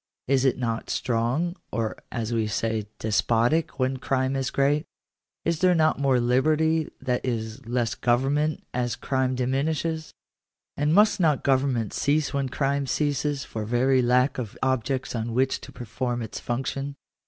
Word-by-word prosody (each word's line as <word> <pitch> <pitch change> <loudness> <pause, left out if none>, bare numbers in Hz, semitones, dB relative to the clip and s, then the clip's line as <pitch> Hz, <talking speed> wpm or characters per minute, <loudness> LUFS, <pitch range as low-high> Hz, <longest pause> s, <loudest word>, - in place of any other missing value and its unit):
Is 135 0 +3
it 130 - +3
not 115 -2 -2
strong, 130 +9 0 0.2
or, 110 0 -1 0.2
as 115 -1 -3
we 110 -2 +1
say, 110 0 -1
despotic, 115 +9 +1
when 130 0 0
crime 130 +1 0
is 135 0 -1
great? 145 +3 +1 0.6
Is 170 -1 +1
there 185 -1 +4
not 155 -2 +3
more 135 -3 +3
liberty, 155 +6 +2
that 125 -1 -1
is, 115 0 -3
less 120 -1 0
government, 140 +5 +1
as 120 -2 -1
crime 130 -1 0
diminishes? 150 +5 -1 0.6
And 150 +1 +1
must 210 +1 +5
not 155 -6 +2
government 130 -5 +1
cease 150 +1 +1
when 140 -2 0
crime 140 +1 0
ceases, 145 0 0
for 110 - -5
very 125 +4 +2
lack 125 +2 +2
of 115 -5 -6
objects 130 0 0
on 115 -1 -3
which 130 +1 +1
to - - -10
perform 120 +1 -3
its 110 - -6
function 135 +3 -3
130 Hz, 155 wpm, -25 LUFS, 120-145 Hz, 0.6 s, must